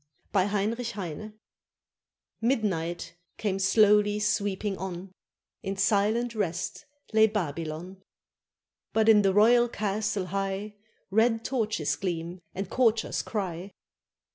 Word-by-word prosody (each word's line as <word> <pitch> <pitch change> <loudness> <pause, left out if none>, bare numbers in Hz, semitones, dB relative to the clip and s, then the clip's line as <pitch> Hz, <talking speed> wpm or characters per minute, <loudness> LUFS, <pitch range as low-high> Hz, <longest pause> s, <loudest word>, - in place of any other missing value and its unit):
] - - -42
BY 190 -2 +4
HEINRICH 220 +4 -1
HEINE 205 +2 -6 1.1
Midnight 195 -10 -1 0.2
came 195 -3 -1
slowly 210 +1 +4
sweeping 205 -1 0
on; 185 0 -6 0.5
In 195 0 -4
silent 220 +4 +2
rest 205 - -3 0.3
lay 220 0 +6
Babylon. 170 -1 -4 0.9
But 220 0 +3
in 215 -2 +7
the 195 -1 +3
royal 240 +4 +5
castle 210 -2 -1
high 195 +1 -2 0.4
Red 225 +2 +2
torches 220 - 0
gleam 175 -1 -4
and 195 0 -3
courtiers 230 0 +1
cry. 190 -2 -4
205 Hz, 110 wpm, -28 LUFS, 190-220 Hz, 1.1 s, in